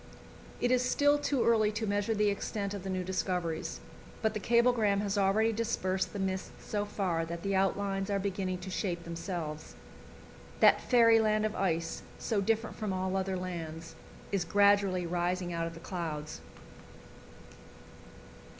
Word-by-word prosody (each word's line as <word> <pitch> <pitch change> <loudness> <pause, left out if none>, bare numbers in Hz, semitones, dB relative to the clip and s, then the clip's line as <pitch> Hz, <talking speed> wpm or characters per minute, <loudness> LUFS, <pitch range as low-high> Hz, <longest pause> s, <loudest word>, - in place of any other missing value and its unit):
It 245 - +1
is 250 -1 +4
still 290 +3 +3
too 280 -3 0
early 220 -2 +4
to 215 +1 -2
measure 205 +2 0
the 210 -1 +3
extent 200 0 -3
of 200 -3 -6
the 195 - -5
new 185 -1 -1
discoveries, 180 -3 -2 0.4
but 220 0 +2
the 215 - -2
cablegram 235 -3 +3
has 200 -1 -1
already 205 +3 +3
dispersed 190 -5 -1
the - - -6
mists 190 -1 -2 0.2
so 205 -1 -1
far 185 -5 -1
that 170 +1 -6
the 195 0 0
outlines 195 0 0
are 200 - +1
beginning 190 -1 -2
to 190 +1 -6
shape 175 -2 -2
themselves. 170 -2 -5 0.8
That - - +6
fairyland 225 -3 +4
of 215 - -2
ice, 165 -3 -1 0.2
so 215 -4 -1
different 225 +2 -1
from 215 -2 -2
all 185 0 -1
other 190 0 -1
lands, 165 -3 -6 0.4
is 195 -3 +1
gradually 200 0 +3
rising 175 +1 -1
out 165 0 -1
of 165 - -8
the - - -9
clouds. 160 -4 -5
195 Hz, 155 wpm, -31 LUFS, 180-215 Hz, 0.8 s, That